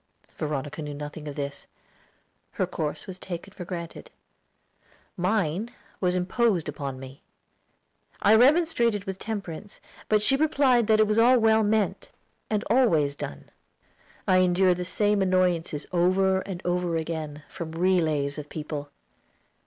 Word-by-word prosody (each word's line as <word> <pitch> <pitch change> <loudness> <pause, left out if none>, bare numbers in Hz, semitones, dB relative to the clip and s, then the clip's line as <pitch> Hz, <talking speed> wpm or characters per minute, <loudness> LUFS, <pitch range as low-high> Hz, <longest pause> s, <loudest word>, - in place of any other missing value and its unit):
Veronica 150 0 -4
knew 150 -1 -5
nothing 150 +1 -7
of 145 - -6
this. 140 -1 -5 0.9
Her - - 0
course 150 -2 -4
was 190 -1 -8
taken 185 +2 -7
for 180 - -8
granted; 170 -2 -7 1.1
mine 185 +2 0 0.3
was 180 -1 +1
imposed 185 0 +1
upon 140 -3 -5
me. 135 +1 -11 1.0
I 210 - +5
remonstrated 240 - +4
with 190 0 -5
Temperance, 205 -3 -6 0.3
but 215 -1 +3
she 270 - +4
replied 275 -6 +3
that 215 -1 +4
it 215 - +6
was 215 +1 +1
all 250 +3 +6
well 220 -1 +4
meant, 215 -1 0 0.4
and 210 -1 0
always 170 - +3
done. 70 - -8 0.8
I 185 - +5
endured 185 0 +3
the 180 - -3
same 205 +2 +1
annoyances 180 -5 +1
over 190 +2 +3
and 190 -2 -6
over 175 -1 0
again, 155 -2 -4
from 160 +1 -7
relays 160 -5 +1
of 150 0 -9
people. 150 -2 -5
180 Hz, 135 wpm, -26 LUFS, 155-210 Hz, 1.1 s, it